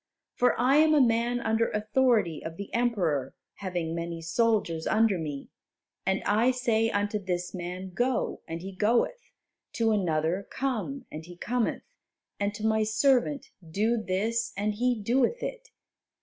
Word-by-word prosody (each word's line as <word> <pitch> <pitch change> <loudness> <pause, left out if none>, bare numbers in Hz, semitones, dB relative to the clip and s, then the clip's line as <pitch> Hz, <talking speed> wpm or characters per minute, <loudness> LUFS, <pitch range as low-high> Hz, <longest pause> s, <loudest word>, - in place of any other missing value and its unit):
For 245 0 +2
I 260 +4 +4
am 310 0 +5
a - - +5
man 240 -1 +2
under 225 0 +1
authority 215 - +1
of 165 0 -6
the 200 - -8
Emperor, 175 - 0 0.2
having 175 -4 -3
many 170 0 -4
soldiers 165 -2 0
under 215 -4 +3
me, 145 -3 -5 0.6
and 190 0 +1
I 220 +5 +3
say 235 -3 +1
unto 205 0 0
this 180 -2 -3
man, 185 +1 -5
'Go,' 245 +4 0
and 165 +1 -5
he 195 - -6
goeth; 235 - +1 0.4
to 225 -1 +2
another, 175 -2 0
'Come,' 270 +1 -3
and 155 +1 -7
he 175 0 -11
cometh, 235 +5 -1 0.6
and 200 0 0
to 215 0 -4
my 220 0 +3
servant, 255 +6 +2
'Do 205 +8 0
this,' 220 +4 -1
and 210 +1 0
he 245 +2 0
doeth 250 - +1
it. - - -5
215 Hz, 150 wpm, -28 LUFS, 180-240 Hz, 0.6 s, am